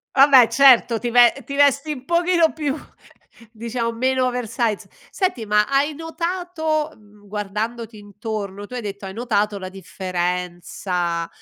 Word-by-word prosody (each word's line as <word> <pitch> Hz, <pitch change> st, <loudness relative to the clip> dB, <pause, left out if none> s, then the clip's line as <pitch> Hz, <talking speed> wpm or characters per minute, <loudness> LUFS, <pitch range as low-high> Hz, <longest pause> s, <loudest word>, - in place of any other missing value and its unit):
Vabbè 270 Hz, -3 st, +7 dB
certo, 250 Hz, -4 st, +5 dB
ti 240 Hz, -, -3 dB
ve 240 Hz, 0 st, +6 dB
ti 280 Hz, -, -6 dB
vesti 285 Hz, +1 st, +3 dB
un 265 Hz, -2 st, -7 dB
pochino 340 Hz, -1 st, +2 dB
più 295 Hz, -3 st, -2 dB, 0.8 s
diciamo 230 Hz, +1 st, -3 dB
meno 260 Hz, +2 st, +1 dB
oversize, 235 Hz, -3 st, -2 dB, 0.2 s
senti 365 Hz, -, -2 dB
ma 210 Hz, 0 st, +3 dB
hai 280 Hz, +2 st, +1 dB
notato, 325 Hz, -1 st, -3 dB
mhmm, 205 Hz, -1 st, -21 dB
guardandoti 215 Hz, +3 st, -4 dB
intorno 205 Hz, -1 st, -6 dB
tu 250 Hz, -, -9 dB
hai 245 Hz, -, -3 dB
detto 200 Hz, -1 st, -7 dB
hai 190 Hz, -, -7 dB
notato 210 Hz, -2 st, -1 dB
la 185 Hz, -1 st, -7 dB
differenza, 180 Hz, -2 st, -3 dB
230 Hz, 135 wpm, -21 LUFS, 205-280 Hz, 0.8 s, Vabbè